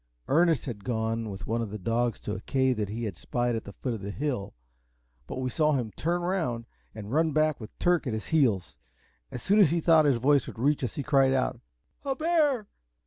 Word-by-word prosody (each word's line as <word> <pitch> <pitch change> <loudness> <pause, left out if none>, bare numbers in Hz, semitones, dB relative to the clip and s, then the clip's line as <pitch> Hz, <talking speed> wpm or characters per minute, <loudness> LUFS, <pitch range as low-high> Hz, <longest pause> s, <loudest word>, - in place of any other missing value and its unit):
Ernest 165 -1 +3
had 110 -6 -6
gone 115 -1 -2
with 100 0 -7
one 115 +2 -1
of 115 - -3
the 105 - -5
dogs 115 +4 0
to 105 - -4
a 95 - -5
cave 130 -1 +1
that 105 -2 -2
he 115 +3 -4
had 105 -5 -3
spied 120 - -1
at 110 - -4
the - - -8
foot 125 +3 -3
of 110 - -6
the 100 - -5
hill, 120 -3 -3 0.7
but - - -6
we 130 - -1
saw 150 +4 +2
him 120 -6 -1
turn 175 +2 -1
round 160 -11 -1 0.3
and 105 -1 -7
run 160 +2 +2
back 155 -1 +2
with 110 - -10
Turk 175 -4 +2
at 120 - -1
his 110 - -4
heels. 100 - +1 0.5
As 125 - -7
soon 205 +2 +3
as 190 -7 +7
he 170 +3 +1
thought 160 -1 +5
his 140 -4 +3
voice 140 +2 +3
would - - -8
reach 140 +4 +1
us, 125 - -3
he 145 - -3
cried 135 -2 +3
out, 130 -2 0 0.4
"A 275 -2 -1
bear! 300 -7 +2
130 Hz, 230 wpm, -28 LUFS, 110-155 Hz, 0.7 s, as